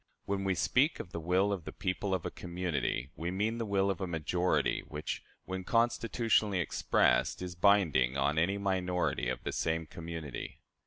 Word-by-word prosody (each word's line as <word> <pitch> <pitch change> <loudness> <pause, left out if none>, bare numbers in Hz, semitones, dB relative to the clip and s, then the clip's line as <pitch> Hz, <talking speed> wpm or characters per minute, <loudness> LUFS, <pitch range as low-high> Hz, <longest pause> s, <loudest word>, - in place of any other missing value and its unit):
When 100 0 -1
we 95 -1 +1
speak 135 - +2
of 90 - -7
the 85 - -4
will 90 +5 +2
of 95 -4 -4
the - - -6
people 95 +1 -1
of 90 - -4
a - - -2
community, 85 -7 -2
we 85 +1 -3
mean 105 +5 -1
the 115 - -2
will 100 -1 +2
of 95 - -5
a 95 - -1
majority, 85 +2 +1
which, 75 0 -4 0.2
when 95 0 -4
constitutionally 115 -2 +2
expressed, 70 -7 +2
is 90 -1 -5
binding 85 -9 +3
on 70 +3 +2
any 95 +5 +2
minority 90 -9 0
of 65 - -3
the - - -2
same 80 0 0
community. 80 -4 -7
90 Hz, 175 wpm, -32 LUFS, 80-100 Hz, 0.2 s, binding